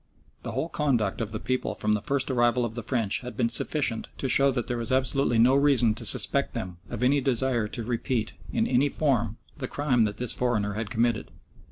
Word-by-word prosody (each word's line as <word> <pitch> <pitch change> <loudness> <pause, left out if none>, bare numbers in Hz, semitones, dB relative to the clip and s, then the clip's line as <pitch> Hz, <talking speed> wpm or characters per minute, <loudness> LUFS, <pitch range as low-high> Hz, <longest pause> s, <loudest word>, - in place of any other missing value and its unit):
The - - -6
whole 160 - -1
conduct 125 -11 0
of 110 -2 -3
the 110 - -4
people 130 0 -2
from 105 0 0
the 105 - 0
first 135 +2 -1
arrival 120 -1 +2
of 115 - -5
the 120 - -4
French 115 -3 -1
had 125 -1 -9
been 115 -2 +1
sufficient 120 -4 0
to 135 - -2
show 140 +2 +4
that 125 -3 -1
there 120 -1 -3
was 115 +2 -3
absolutely 130 -1 +1
no 120 +3 +5
reason 135 -5 +4
to - - -6
suspect - - +2
them 90 -2 -5
of 120 - -4
any 140 +3 +3
desire 125 -3 +1
to 115 +2 -6
repeat, 115 -1 -2 0.2
in 225 - +1
any 135 - +2
form, 120 -8 0 0.2
the 130 - -3
crime 130 -6 +1
that 105 -1 -4
this 125 -2 +2
foreigner 105 -5 0
had 110 +1 -4
committed. 115 -1 0
120 Hz, 215 wpm, -26 LUFS, 110-130 Hz, 0.2 s, no